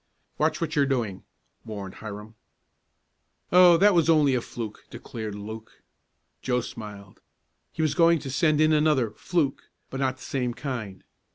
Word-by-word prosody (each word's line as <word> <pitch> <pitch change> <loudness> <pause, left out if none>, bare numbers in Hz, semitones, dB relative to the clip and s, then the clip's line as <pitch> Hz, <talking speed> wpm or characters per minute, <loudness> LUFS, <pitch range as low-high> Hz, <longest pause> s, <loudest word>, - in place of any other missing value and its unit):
"Watch - - +1
what 165 -3 -2
you're 140 -2 +3
doing," 115 -8 -2 0.4
warned 100 -3 -7
Hiram. 105 0 -8 1.2
"Oh, 180 -1 +7
that 205 +3 +5
was 170 -2 +3
only 150 -4 +4
a 125 - +1
fluke," 115 -3 -7
declared 110 -3 -7
Luke. 110 +2 -9 0.6
Joe 125 -1 0
smiled. 105 -4 -10 0.5
He 160 - -2
was 155 - +1
going 170 -1 +5
to 135 -3 -6
send 150 +3 +2
in 155 0 +4
another 150 -7 +2
"fluke," 145 +4 -2 0.2
but 135 - -4
not 130 -1 0
the - - -13
same 125 -3 -2
kind. 120 -10 -5
130 Hz, 155 wpm, -26 LUFS, 110-155 Hz, 1.2 s, Oh